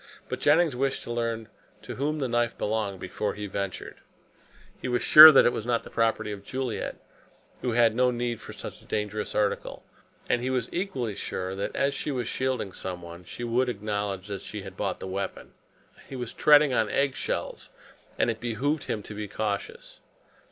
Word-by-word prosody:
But - - -3
Jennings 155 -1 +4
wished 135 +1 -1
to - - -6
learn 115 -1 -2 0.4
to - - -6
whom 150 +3 -1
the 135 -3 -1
knife 120 -1 0
belonged 105 -3 -2
before 95 +3 -3
he 105 - -5
ventured. 100 -1 -5 0.8
He - - -3
was 125 -1 0
sure 155 +1 +12
that 135 - +6
it 120 - +3
was - - -3
not 120 -1 +1
the - - -12
property 110 -2 0
of 100 -1 -7
Juliet, 130 0 -3 0.7
who 125 - -1
had 115 -1 +4
no 125 +2 +3
need 120 -1 -2
for - - -9
such - - -8
a - - -19
dangerous 105 0 -3
article, 105 -1 -1 0.4
and 120 - +1
he 130 - -1
was 125 -3 -1
equally 170 - -2
sure 95 -1 -4
that 100 +1 -4
as 140 +1 +1
she 150 - -3
was 125 -5 -2
shielding 130 -6 -1
someone, 90 -1 -7
she 120 - -7
would 120 +2 +1
acknowledge 100 -3 -3
that 100 -2 -4
she 105 -1 -7
had 95 -1 -9
bought 95 -1 -2
the - - -6
weapon. 95 +1 -5 0.6
He 135 - -7
was 125 -3 -5
treading 150 -2 +5
on 110 -3 +2
egg 140 -1 +1
shells, - - -4 0.5
and - - +2
it 110 - -7
behooved 125 +6 -1
him 105 - -3
to 105 - -9
be 105 0 -5
cautious. 105 0 -4
115 Hz, 195 wpm, -27 LUFS, 105-130 Hz, 0.8 s, sure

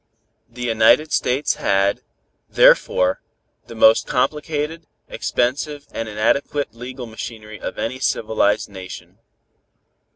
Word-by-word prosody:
The 125 +1 -8
United 120 +7 +4
States 140 +3 0
had, 100 0 +1 0.5
therefore, 90 0 +4 0.5
the 115 - -10
most 110 0 +5
complicated, 150 +4 -2 0.2
expensive 145 +4 -2
and 115 -1 -4
inadequate 125 +6 0
legal 125 +2 -8
machinery 110 -1 -8
of - - -6
any 130 +3 -3
civilized 110 -4 +1
nation. 95 -2 -10
120 Hz, 100 wpm, -20 LUFS, 110-140 Hz, 0.5 s, most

